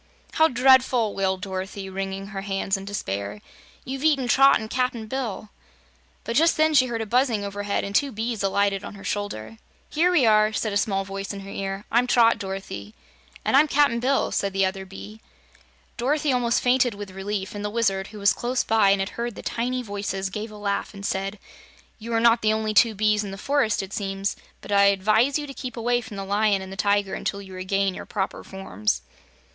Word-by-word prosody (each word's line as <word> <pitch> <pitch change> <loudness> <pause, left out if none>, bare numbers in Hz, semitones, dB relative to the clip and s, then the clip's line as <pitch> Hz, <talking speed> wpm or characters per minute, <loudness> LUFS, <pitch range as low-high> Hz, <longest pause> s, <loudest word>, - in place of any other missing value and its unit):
"How 320 - +4
dreadful!" 250 -4 +4
wailed 190 -1 -1
Dorothy, 195 0 -5
wringing 195 +1 -5
her 195 -2 -5
hands 195 0 -1
in 195 0 -6
despair. 100 - -4 0.5
"You've 265 +2 -5
eaten 285 -5 +2
Trot 270 +3 +6
and 220 - -6
Cap'n 250 -1 -1
Bill." 220 -4 -4 0.7
But 230 - -4
just 325 +4 +4
then 310 0 +3
she 255 -3 +5
heard 230 -2 -3
a - - -2
buzzing 235 -2 +1
overhead 200 0 -2
and 200 - -5
two 280 +6 +2
bees 225 0 -3
alighted 200 0 +1
on - - -8
her 195 - -12
shoulder. 115 - -4 0.3
"Here 335 +4 +3
we 320 -9 +4
are," 215 0 +4
said 215 0 -1
a - - +2
small 195 -1 0
voice 195 0 -5
in 200 - -7
her 195 0 -9
ear. 195 +1 -4
"I'm 240 +2 +3
Trot, 230 -2 +4
Dorothy." 195 +2 -6 0.5
"And - - +2
I'm 295 +3 +6
Cap'n 280 -5 +3
Bill," 265 +3 +1
said 200 -1 -1
the 195 0 +2
other 190 0 -4
bee. 210 +3 -10 0.8
Dorothy 285 +3 +1
almost 240 -2 +1
fainted, 245 -2 +3
with 200 -1 -8
relief, 195 +1 -4
and 205 0 -5
the 210 - -1
Wizard, 195 -4 0
who 215 - -11
was 200 0 +3
close 245 +1 -1
by 220 -3 +3
and 195 0 +3
had 195 - -2
heard 235 -1 -4
the - - -9
tiny 250 +2 -2
voices, 200 -2 -3
gave 215 +3 -5
a 210 - -11
laugh 205 0 -2
and 200 0 -7
said: 195 +2 -2 0.6
"You 230 +2 -7
are 225 - +3
not 230 0 +4
the 215 0 +3
only 220 0 -1
two 215 +3 +4
bees 215 +1 +2
in 200 - -5
the 195 - -7
forest, 265 -3 +1
it 195 - -9
seems, 195 -1 -2 0.3
but - - -9
I 200 0 +5
advise 215 +7 +3
you 300 - -4
to 275 - -8
keep 255 -3 -7
away 240 +1 +1
from 215 -3 -9
the 195 - -4
Lion 200 0 +1
and 190 - -9
the - - -6
Tiger 200 0 +1
until 200 - -3
you 190 -1 -10
regain 190 +1 0
your - - -8
proper 195 -2 -3
forms." 105 - -3
210 Hz, 215 wpm, -24 LUFS, 195-240 Hz, 0.8 s, Trot